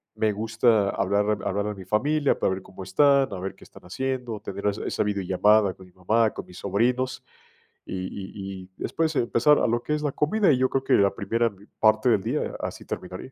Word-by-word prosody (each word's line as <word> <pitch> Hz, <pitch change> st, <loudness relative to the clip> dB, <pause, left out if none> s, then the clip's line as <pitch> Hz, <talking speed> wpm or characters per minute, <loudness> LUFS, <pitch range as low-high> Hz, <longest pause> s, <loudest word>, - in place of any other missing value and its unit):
me 110 Hz, -1 st, +1 dB
gusta 110 Hz, -1 st, +2 dB
hablar 100 Hz, +2 st, 0 dB, 0.2 s
hablarle 100 Hz, +2 st, -1 dB
a -, -, -5 dB
mi 95 Hz, -2 st, -10 dB
familia, 145 Hz, +9 st, +2 dB
para 95 Hz, -, +1 dB
ver 95 Hz, -, -5 dB
cómo 95 Hz, +1 st, -12 dB
están, 140 Hz, +7 st, +3 dB
a 95 Hz, -, -5 dB
ver 95 Hz, +1 st, -4 dB
qué -, -, -17 dB
están -, -, -16 dB
haciendo, 125 Hz, +1 st, -3 dB
tener 105 Hz, -1 st, -7 dB
es 100 Hz, +1 st, 0 dB
esa -, -, -1 dB
videollamada 100 Hz, 0 st, +2 dB
con 95 Hz, -, -14 dB
mi 90 Hz, -, -20 dB
mamá, 110 Hz, +4 st, +2 dB
con -, -, -6 dB
mis 90 Hz, -, -14 dB
sobrinos, 125 Hz, +6 st, 0 dB, 0.6 s
y 95 Hz, 0 st, -4 dB
y 95 Hz, -1 st, -7 dB
y 90 Hz, -, -17 dB
después, 160 Hz, -1 st, -1 dB
empezar 120 Hz, +5 st, +3 dB
a -, -, +2 dB
lo 120 Hz, +1 st, 0 dB
que 150 Hz, -, -2 dB
es 150 Hz, -, -3 dB
la 145 Hz, -2 st, -1 dB
comida, 195 Hz, +4 st, +2 dB
y 130 Hz, -, +3 dB
yo 130 Hz, 0 st, +2 dB
creo 135 Hz, 0 st, -1 dB
que -, -, +1 dB
la 100 Hz, -1 st, +4 dB
primera 115 Hz, +2 st, 0 dB, 0.3 s
parte 110 Hz, +2 st, +4 dB
del 100 Hz, -4 st, +3 dB
día, 130 Hz, +7 st, -2 dB
así -, -, -5 dB
terminaría. 90 Hz, +7 st, -7 dB
110 Hz, 215 wpm, -25 LUFS, 95-130 Hz, 0.6 s, la